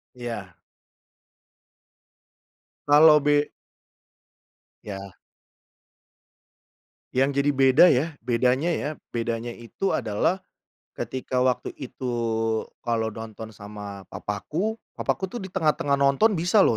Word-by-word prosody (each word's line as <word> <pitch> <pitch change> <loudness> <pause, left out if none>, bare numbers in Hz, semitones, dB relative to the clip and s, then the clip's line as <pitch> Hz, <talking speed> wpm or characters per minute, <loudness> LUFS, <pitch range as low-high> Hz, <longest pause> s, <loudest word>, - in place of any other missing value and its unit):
Iya. 115 -7 -6 2.3
Kalo 150 +1 +8
be 145 0 +2 1.3
Ya. 100 -2 -8 2.0
Yang 135 +2 +2
jadi 145 +1 +2
beda 135 +4 +7
ya, 135 +3 +3
bedanya 125 +6 +1
ya, 160 -3 -1 0.2
bedanya 115 0 -2
itu 120 +11 -4
adalah, 110 - 0 0.5
ketika 130 0 -3
waktu 130 -1 0
itu 130 -2 -5 0.7
kalau 115 -2 0
nonton 110 0 -8
sama 100 -1 -9
papaku, 160 - -3 0.2
papaku - - -1
tuh 240 - -4
di 190 - -6
tengah-tengah 150 -5 +1
nonton 140 +10 +4
bisa 180 +6 +4
loh 115 - +3
130 Hz, 95 wpm, -25 LUFS, 115-150 Hz, 2.3 s, Kalo